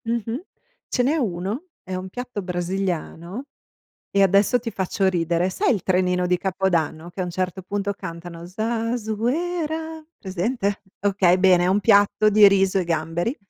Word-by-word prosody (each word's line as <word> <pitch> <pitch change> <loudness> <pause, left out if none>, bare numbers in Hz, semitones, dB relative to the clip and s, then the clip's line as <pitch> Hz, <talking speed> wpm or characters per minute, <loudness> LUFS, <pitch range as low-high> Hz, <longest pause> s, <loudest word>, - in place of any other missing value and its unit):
Mh-mh. 230 +3 -2 0.5
Ce 250 - +1
n'è 280 +5 +2
uno, 215 - -2 0.2
è 190 - -7
un 185 +1 -5
piatto 245 0 -5
brasiliano 180 - -3 0.7
e 200 - +3
adesso 200 +5 +4
ti 235 -1 -5
faccio 190 -1 -1
ridere, 175 0 +1
sai 220 - +1
il 195 - -4
trenino 180 -1 +1
di 180 0 +2
Capodanno 175 -4 -1
che 185 - -7
a - - 0
un 180 - -4
certo 185 +1 -3
punto 200 +2 -2
cantano 170 -2 -8
Zazuera, 245 - -2
presente? 200 +2 -2 0.2
Okay, 190 -3 +3
bene, 185 -2 +5
è - - +2
un 195 +2 +3
piatto 205 0 +4
di 210 -1 +7
riso 195 -1 +2
e 185 - 0
gamberi 170 - -1
195 Hz, 155 wpm, -23 LUFS, 180-225 Hz, 0.7 s, di